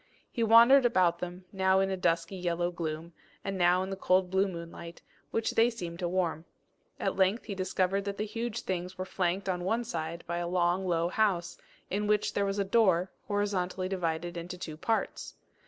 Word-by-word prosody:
He 235 - -3
wandered 235 +4 +7
about 185 -8 +3
them, 180 +1 -6
now 190 0 +3
in 195 0 +1
a - - 0
dusky 170 0 0
yellow 175 -1 -1
gloom, 165 -1 -5 0.3
and 195 -1 -3
now 180 0 +3
in 190 - -5
the - - -2
cold 185 -1 +2
blue 190 +1 +3
moonlight, 170 -1 -8 0.3
which 225 0 -1
they 230 +1 +4
seemed 175 -8 -6
to 175 - -1
warm. 170 -3 -1 0.6
At - - -1
length 195 +4 +2
he 210 - -5
discovered 190 +1 0
that 200 0 -3
the 215 - -1
huge 230 +1 -4
things 180 0 -4
were 185 - -3
flanked 190 +1 -1
on 180 -2 -1
one 225 +6 0
side 170 -5 -4
by 170 +1 -3
a 175 0 -2
long 180 +1 +1
low 170 -1 +1
house, 180 -4 +1 0.4
in 210 +2 0
which 210 0 +1
there 200 - +1
was 195 +1 -2
a 200 - +2
door, 190 -4 +3 0.2
horizontally 195 -3 -1
divided 175 -2 -2
into 175 +2 -6
two 160 -4 -6
parts. 225 +8 -2
185 Hz, 195 wpm, -30 LUFS, 175-200 Hz, 0.6 s, wandered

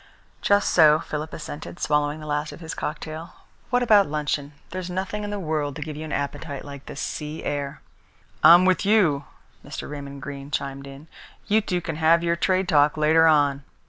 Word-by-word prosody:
"Just 205 0 +3
so," 155 -3 +6
Philip 155 0 -5
assented, 155 +2 -8
swallowing 150 +1 0
the - - -8
rest 150 0 -2
of - - -11
his 165 -1 -6
cocktail. 155 +2 -6 0.3
"What 245 0 +2
about 210 -4 +5
luncheon? 150 -1 -2 0.2
There's 185 0 -5
nothing 190 +3 -3
in 205 - -4
the 205 - -3
world 155 -5 -2
to 150 - -4
give 155 -1 -7
you 155 - -6
an 155 - -7
appetite 140 0 -4
like 140 -1 -10
this - - -7
sea 150 0 -5
air." 140 -1 -4 0.6
"I'm 175 +2 +9
with 185 -1 +3
you," 185 -9 +3 0.4
Mr. - - -7
Raymond 140 -1 -8
Greene 140 0 -7
chimed 140 -1 -4
in. 140 +3 -11 0.4
"You 215 +1 +3
two 180 -3 -2
can 165 -2 -5
have 165 +1 +4
your 170 0 +1
trade 185 +2 +1
talk 150 -3 +3
later 160 +2 +5
on." 145 -3 +3
155 Hz, 190 wpm, -24 LUFS, 145-175 Hz, 0.6 s, I'm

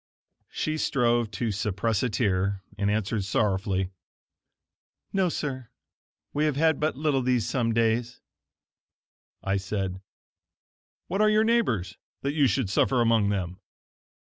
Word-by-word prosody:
She 155 0 -2
strove 120 -6 +2
to 110 +2 -2
suppress 100 +1 -1
a 125 - +1
tear, 100 -3 0
and 100 0 0
answered 105 0 0
sorrowfully: 95 -1 0 1.2
"No 190 -2 +2
sir; 130 -7 -4 0.6
we 150 +1 +1
have 150 -3 +1
had 160 0 +2
but 155 -2 0
little 145 -3 +1
these 125 -3 +1
some 120 -3 0
days." 115 +1 +1 1.2
I 100 0 +1
said: 95 -1 -3 1.0
"What 195 +3 -1
are 215 - +5
your 215 0 +4
neighbors, 120 - +1 0.2
that 140 +1 0
you 145 -3 +4
should 120 0 0
suffer 130 +4 +2
among 115 -3 +3
them?" 90 -3 -2
115 Hz, 130 wpm, -27 LUFS, 100-140 Hz, 1.2 s, are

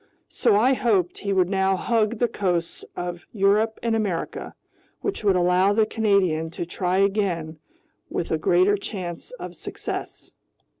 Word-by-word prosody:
So - - +2
I 245 +6 +4
hoped 200 -9 +1
he 200 - -2
would 185 -2 +3
now 190 0 +2
hug 225 +2 +1
the 240 - +2
coasts 180 -6 -2
of 175 -1 -5
Europe 210 +2 +2
and 230 -1 +1
America, 200 -7 -3 0.5
which 395 - -3
would 200 -2 +4
allow 180 +2 +3
the 220 +1 +3
Canadian 195 -8 +1
to 175 - -2
try 180 +1 -1
again 190 -6 0 0.5
with 170 - -3
a 160 - +1
greater 185 +5 +3
chance 180 -4 -6
of - - -7
success. - - -6
195 Hz, 150 wpm, -24 LUFS, 175-215 Hz, 0.5 s, I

